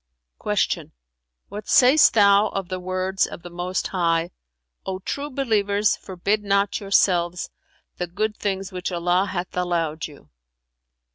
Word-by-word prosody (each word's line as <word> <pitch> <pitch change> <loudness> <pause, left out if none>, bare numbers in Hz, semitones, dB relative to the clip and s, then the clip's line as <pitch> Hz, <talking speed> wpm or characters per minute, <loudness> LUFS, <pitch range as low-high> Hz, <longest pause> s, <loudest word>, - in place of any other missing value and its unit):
'" - - -31
Q - - -1 0.9
"What 210 +1 -8
sayst 265 +3 +6
thou 200 0 +5
of 195 -4 -4
the 185 0 -3
words 185 +1 -1
of 170 - -10
the 175 - -9
Most 180 +2 -3
High, 170 -2 0 0.5
'O 190 -1 -3
true 280 +9 -4
believers, 210 -6 +1
forbid 200 +3 -2
not 200 0 +1
yourselves 180 -3 +1 0.5
the 180 - -3
good 210 +5 -2
things 195 -1 -3
which 180 0 -4
Allah 180 +2 +1
hath 180 -1 -4
allowed 170 -3 -1
you?'" 140 - -17
185 Hz, 140 wpm, -23 LUFS, 175-205 Hz, 0.9 s, sayst